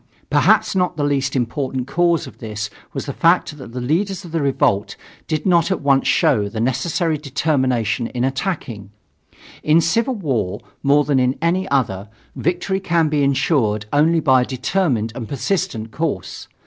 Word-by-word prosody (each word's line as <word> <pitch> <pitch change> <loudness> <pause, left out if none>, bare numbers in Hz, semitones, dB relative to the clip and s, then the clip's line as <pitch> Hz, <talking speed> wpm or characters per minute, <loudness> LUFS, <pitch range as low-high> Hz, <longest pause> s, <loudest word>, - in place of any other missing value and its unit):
Perhaps - - +3
not 180 -3 0
the 145 - 0
least 140 -1 0
important 130 +1 -2
cause 170 +2 +1
of 130 - -13
this 105 -3 -5 0.2
was - - -5
the 140 - -4
fact 165 -1 +2
that 130 -3 -10
the 125 - -5
leaders 185 +9 -1
of 170 - -10
the 165 -1 -1
revolt 120 -7 +1 0.3
did 155 -2 -2
not 175 -3 +3
at 190 - -1
once 140 -2 +2
show 105 -1 +2
the 110 - -5
necessary 155 - 0
determination 130 -6 0
in 125 -1 -3
attacking. 135 - -3 0.7
In 155 +2 +4
civil 230 +10 +1
war, 115 - -2 0.2
more 145 +1 +4
than 140 -2 +2
in 130 +1 +1
any 175 +3 0
other, 105 -8 -1 0.3
victory 180 +3 -1
can 170 -4 +1
be 150 -1 +1
insured 130 -6 +1
only 160 +3 +4
by 130 -5 +4
a - - 0
determined 130 - -1
and 115 -3 -7
persistent 120 - -2
course. 145 - -4
140 Hz, 165 wpm, -20 LUFS, 125-165 Hz, 0.7 s, In